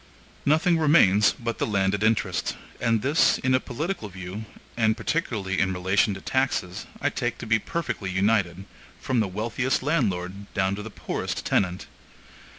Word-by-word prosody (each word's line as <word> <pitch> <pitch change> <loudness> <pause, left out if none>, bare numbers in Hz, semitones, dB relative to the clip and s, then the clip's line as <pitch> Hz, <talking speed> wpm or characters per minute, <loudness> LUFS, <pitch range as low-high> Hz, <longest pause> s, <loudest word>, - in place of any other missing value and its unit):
Nothing 160 +3 +3
remains 105 - +5
but 115 -2 -4
the - - 0
landed 100 -1 +1
interest; 110 0 0 0.2
and 115 -2 +1
this, 145 +4 +4
in 130 0 0
a 130 - +4
political 145 - -4
view, 95 +3 -7 0.3
and 110 -1 +2
particularly 110 -8 -1
in 95 -1 +2
relation 95 +3 +1
to 95 - -9
taxes, 130 -9 -1
I - - 0
take - - -2
to - - -7
be 110 0 +3
perfectly 115 - -3
united, 95 -1 +1 0.3
from 130 -4 0
the 110 - +2
wealthiest 115 +7 -1
landlord 100 - -1
down 95 0 +1
to 100 - -4
the 110 - -7
poorest - - -4
tenant. 90 -1 0
110 Hz, 155 wpm, -25 LUFS, 95-130 Hz, 0.3 s, remains